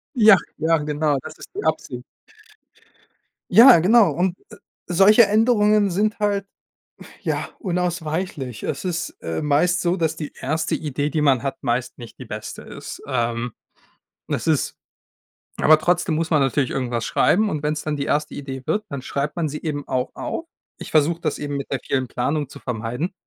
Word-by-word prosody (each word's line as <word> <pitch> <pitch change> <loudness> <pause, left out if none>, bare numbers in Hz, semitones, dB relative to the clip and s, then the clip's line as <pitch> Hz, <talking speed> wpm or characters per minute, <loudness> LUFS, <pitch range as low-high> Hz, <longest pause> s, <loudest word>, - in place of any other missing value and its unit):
Ja, 220 -4 +8 0.2
ja, 165 +1 +2
genau. 150 -1 0
Das - - -9
ist - - -10
die 410 - -4
Absicht. - - -2 1.5
Ja, 230 +1 +9
genau 210 +5 +5
und, 180 +1 -1
äh, - - -12 0.3
solche 195 +6 +6
Änderungen 210 -1 +3
sind 215 +5 0
halt, 205 -1 0 0.8
ja, - - -2
unausweichlich. 170 - -3
Es - - -4
ist, 175 -2 -2
äh, 80 -1 -3
meist 165 +5 +2
so, 175 +1 +1
dass 165 -4 -1
die 150 - -6
1. 155 +4 -2
Idee, 145 -1 -2
die 155 - -1
man 135 -5 +3
hat, 135 0 -4
meist 125 0 -2
nicht 120 -2 -11
die 130 - -8
beste 110 -2 -7
ist. - - -9
Ähm, 120 -2 -1 0.8
es - - -3
ist - - +1 0.9
aber 155 0 +6
trotzdem 175 +1 +1
muss 160 +1 -1
man 155 -3 +3
natürlich 135 0 +1
irgendwas 120 -3 -2
schreiben, 210 - +2
und 150 -4 -3
wenn 150 0 0
es 150 - -5
dann 155 - -2
die 140 - -2
1. 150 +1 -1
Idee 135 -2 -6
wird, 210 +1 0
dann 140 -2 -6
schreibt 140 +4 -3
man 170 -2 0
sie 150 0 -5
eben 145 -3 -4
auch 130 0 -1
auf. 330 - -5 0.3
Ich - - -8
versuche 160 +2 +2
das - - -2
eben 145 -1 -3
mit 140 - -6
der 135 - -2
vielen 130 -2 -1
Planung 145 +4 -1
zu - - -12
vermeiden. 125 - -3
155 Hz, 180 wpm, -22 LUFS, 135-180 Hz, 1.5 s, Ja